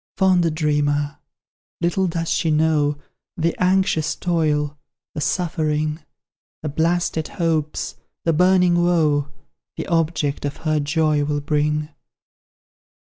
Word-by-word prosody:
Fond 180 -3 +3
dreamer! 145 -2 0 0.6
little 175 +2 +1
does 165 -1 -2
she 165 - +1
know 150 -1 +2 0.4
The 170 0 0
anxious 180 -4 +2
toil, 150 -4 0 0.4
the 150 - -4
suffering, 155 -3 -1 0.6
The 155 - -2
blasted 160 +1 0
hopes, 160 -4 -2 0.3
the 165 - +3
burning 180 +1 +4
woe, 155 -5 +2 0.5
The - - -3
object 160 -4 0
of 145 -1 -3
her 155 -1 +2
joy 150 0 +1
will 145 0 -1
bring. 150 +1 0
155 Hz, 110 wpm, -21 LUFS, 150-170 Hz, 0.6 s, burning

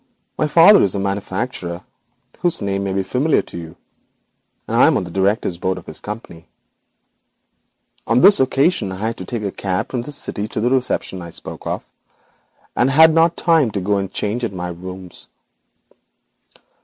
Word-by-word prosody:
'My 155 - 0
father 170 +7 +7
is 100 - +1
a - - -1
manufacturer 95 -2 -3 0.6
whose 175 -2 0
name 100 -1 -2
may 95 - -2
be 95 0 0
familiar 135 +10 +1
to - - -12
you, 85 -1 -8 0.9
and - - -2
I - - +7
am - - +3
on - - -2
the 90 - -8
directors' 95 -1 0
board 95 0 -1
of 90 - -10
his 80 - -7
company. 105 -6 -9 1.6
On - - +3
this 200 - +7
occasion 135 - +1
I 105 +4 -2
took 95 - -9
a 100 - -2
cab 95 -1 -3
from 125 - -2
the 140 +5 -8
city 105 -7 -4
to 110 - -4
the 120 +3 +1
reception 125 -7 -1
I 85 - -8
spoke - - -8
of, - - -3 0.9
and 125 - +3
had 160 +3 +6
not 165 +1 +3
time 165 -7 +3
to 100 - -3
go 100 +2 0
and 95 -1 -3
change 110 +4 -2
at 115 - -2
my 90 -1 -4
rooms. 90 +1 -9
100 Hz, 175 wpm, -19 LUFS, 95-130 Hz, 1.6 s, father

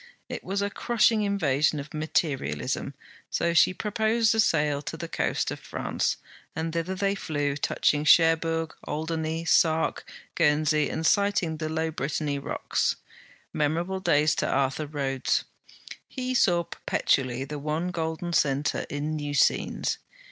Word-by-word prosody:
It - - -5
was 195 +2 -1
a 200 - -2
crushing 225 -1 +2
invasion 155 -8 +1
of 140 +1 -8
materialism, 135 - -1 0.3
so 170 0 0
she 170 +2 +5
proposed 220 +3 +1
a 225 - 0
sail 150 -7 +2
to 150 +2 -6
the 170 - -5
coast - - -1
of - - -5
France, - - -2 0.4
and 160 0 -3
thither 170 +3 -2
they 195 +1 +1
flew, 145 -7 -2
touching 145 +1 +1
Cherbourg, 165 0 +4
Alderney, 160 +1 -2
Sark, 160 -1 +2 0.3
Guernsey, 150 -1 +2
and 160 - -3
sighting 190 -4 +2
the 155 0 -3
low 160 0 -1
Brittany 145 -1 -2
rocks. - - -1 0.6
Memorable 170 +6 0
days 150 -4 +3
to - - 0
Arthur 135 +3 0
Rhodes. 135 -3 -1 0.6
He 255 -1 -3
saw 175 -8 +3
perpetually 130 -5 0
the 150 +1 -6
one 155 +5 -2
golden 165 0 -3
centre 140 -2 +1
in 150 +2 -3
new 145 -1 -3
scenes. - - +1
160 Hz, 140 wpm, -27 LUFS, 145-175 Hz, 0.6 s, she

